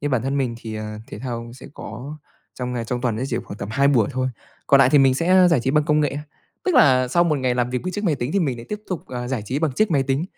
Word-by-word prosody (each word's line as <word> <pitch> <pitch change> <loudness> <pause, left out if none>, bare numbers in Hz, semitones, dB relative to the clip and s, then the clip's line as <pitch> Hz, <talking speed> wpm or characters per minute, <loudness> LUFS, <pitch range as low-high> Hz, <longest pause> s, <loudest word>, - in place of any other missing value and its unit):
nhưng 145 - -2
bản 130 -4 +1
thân 135 +2 -1
mình 125 -4 -1
thì, 110 -2 -7
ờ, 105 0 -6
thể - - -8
thao 120 -1 -5
sẽ 130 - -12
có 145 +4 -8 0.4
trong 125 -1 -4
ngày, 120 -2 -3
trong 125 +1 -3
tuần 120 -3 -1
ấy 125 +4 -2
chỉ 120 - -1
khoảng 100 - -9
tầm - - -5
2 140 +2 +3
buổi 125 -7 +3
thôi. 130 0 -1 0.4
Còn 140 - +6
nại 130 -1 +5
thì 145 - +6
mình 135 -1 +5
sẽ, 165 +5 -1
ơ, 185 -1 +6
giải 165 -7 +3
trí 130 - 0
bằng 150 +1 +2
công 150 0 +2
nghệ, 145 -2 0 0.5
tức 370 - +1
là 130 - +5
sau 175 +6 +3
một 155 -4 +1
ngày 130 -2 0
làm 125 0 0
việc 125 0 -2
với 185 - -4
chiếc 205 +2 -4
máy 165 -6 +2
tính 130 0 -4
thì 200 - +2
mình 135 -8 -1
lại 115 - -10
tiếp 210 0 -4
tục, 185 -4 -5
à, 125 -1 -5
giải 125 -5 -2
trí 130 +7 -1
bằng 155 -3 0
chiếc 215 +9 +1
máy 140 -4 +3
tính. 135 +4 0
130 Hz, 320 wpm, -22 LUFS, 125-150 Hz, 0.5 s, Còn